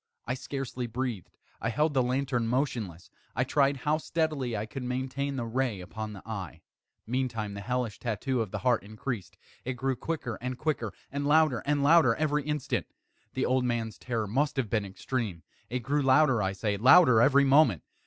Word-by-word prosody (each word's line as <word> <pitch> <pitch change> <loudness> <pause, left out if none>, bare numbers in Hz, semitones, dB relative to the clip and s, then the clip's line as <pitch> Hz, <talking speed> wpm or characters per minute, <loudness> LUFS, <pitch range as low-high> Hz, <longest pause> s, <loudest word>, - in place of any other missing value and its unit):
I 125 - -1
scarcely 130 -2 -4
breathed. 120 - -4 0.3
I 115 - 0
held 150 +6 +1
the 135 - +3
lantern 125 -1 0
motionless. 115 - -2 0.2
I 125 - +2
tried 140 +1 +2
how 150 +4 0
steadily 155 -8 -1
I 105 - -2
could 130 +4 -7
maintain 130 +3 -2
the 120 -3 -2
ray 120 -3 -1
upon 105 +4 -6
the 95 - -10
eve. 95 -7 -6 0.4
Meantime 115 -4 -2
the 100 - -6
hellish 125 -1 -2
tattoo 125 +2 -1
of 110 - -3
the - - -4
heart 125 -3 +3
increased. 110 0 -6 0.3
It 130 - -2
grew 130 +1 -1
quicker 130 -3 -4
and 125 0 -3
quicker, 135 -9 -1 0.2
and 140 +1 -2
louder 150 -5 +4
and 145 -1 +2
louder 145 -6 +6
every 150 -1 +1
instant. 150 -2 -2 0.5
The 130 - +1
old 130 0 +2
man's 115 -3 -2
terror 115 -3 -2
must 140 +8 0
have 120 -6 -1
been 110 -3 +1
extreme! 95 -1 -4 0.3
It 125 +1 -3
grew 145 +4 +1
louder, 135 -3 +4
I 95 0 0
say, 100 +1 -1
louder 125 - +7
every 140 +2 +5
moment! 135 - +4
125 Hz, 185 wpm, -29 LUFS, 110-140 Hz, 0.5 s, louder